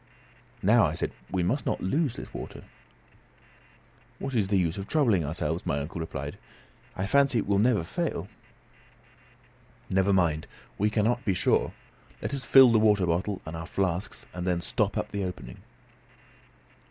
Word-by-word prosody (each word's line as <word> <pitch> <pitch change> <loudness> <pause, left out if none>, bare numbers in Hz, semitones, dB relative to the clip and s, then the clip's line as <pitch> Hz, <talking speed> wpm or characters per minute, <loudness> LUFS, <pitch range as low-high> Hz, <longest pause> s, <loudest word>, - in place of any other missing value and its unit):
"Now," - - +5
I - - -3
said, - - -2 0.2
"we 90 -1 0
must 120 +11 0
not - - 0
lose 140 - 0
this - - -9
water." - - -7 1.5
"What 135 - -5
is 105 -5 +1
the 100 0 +2
use 85 0 0
of 95 - -6
troubling 115 - +2
ourselves?" 80 +2 -2
my 70 - -1
uncle, 80 +5 -5
replied. 80 - -5 0.6
"I 95 - -2
fancy 140 +3 +3
it 110 - 0
will 100 0 +2
never 110 -4 +3
fail." 85 - -3 1.6
"Never 95 +1 +3
mind, 85 -5 +1 0.3
we 105 +2 +3
cannot 115 +3 +1
be 95 -6 +1
sure; 85 - +1 0.5
let - - -4
us 135 -2 -3
fill 130 +1 +7
the 115 - +4
water 105 -3 +4
bottle 90 +4 -1
and 80 - -6
our 80 0 -6
flasks, 95 0 -2
and 90 +1 -4
then 90 -1 +1
stop 80 - -1
up - - -2
the 100 -1 -3
opening." 90 -10 -6
95 Hz, 165 wpm, -27 LUFS, 85-110 Hz, 1.6 s, fill